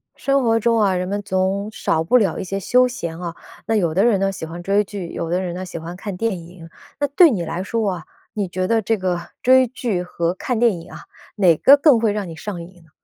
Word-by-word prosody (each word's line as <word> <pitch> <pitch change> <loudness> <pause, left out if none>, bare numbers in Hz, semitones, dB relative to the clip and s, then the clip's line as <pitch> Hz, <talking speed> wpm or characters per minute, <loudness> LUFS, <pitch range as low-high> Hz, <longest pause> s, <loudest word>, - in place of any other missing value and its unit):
生 275 -1 +1
活 225 -1 +3
中 230 +1 +2
啊， 200 -3 +2
人 180 0 -2
们 205 +2 -2
总 195 +1 -1
少 160 -6 -1
不 215 +10 +4
了 210 -5 +1
一 - - -3
些 195 +1 -3
休 250 +6 +3
闲 170 -10 -5
啊， 170 -1 -5 0.3
那 225 - +1
有 170 -7 +1
的 195 - +3
人 225 -4 +3
呢 195 0 +1
喜 185 -4 -6
欢 170 +2 -8
追 200 +3 +2
剧， 200 -3 -7
有 165 - -4
的 180 +2 +1
人 175 -2 -4
呢 185 +1 -5
喜 180 -2 -7
欢 165 +2 -7
看 195 +1 -6
电 225 -2 -1
影。 170 0 -13 0.3
那 290 - +1
对 315 +3 +5
你 185 -7 -1
来 175 +3 -4
说 220 0 -1
啊， 175 -3 -6 0.3
你 205 -3 -2
觉 185 +1 -2
得 225 +1 +2
这 220 +2 0
个 185 -2 -1 0.2
追 260 0 +5
剧 230 -7 -3
和 170 -1 -2
看 230 +5 -3
电 235 -2 +4
影 - - -14
啊， - - -9 0.4
哪 185 -6 +4
个 275 - +6
更 285 -4 +5
会 220 -2 +2
让 205 -2 -3
你 165 - -8
上 175 +1 -6
瘾 175 0 -13
呢？ 160 - -24
195 Hz, 275 characters per minute, -20 LUFS, 175-225 Hz, 0.4 s, 个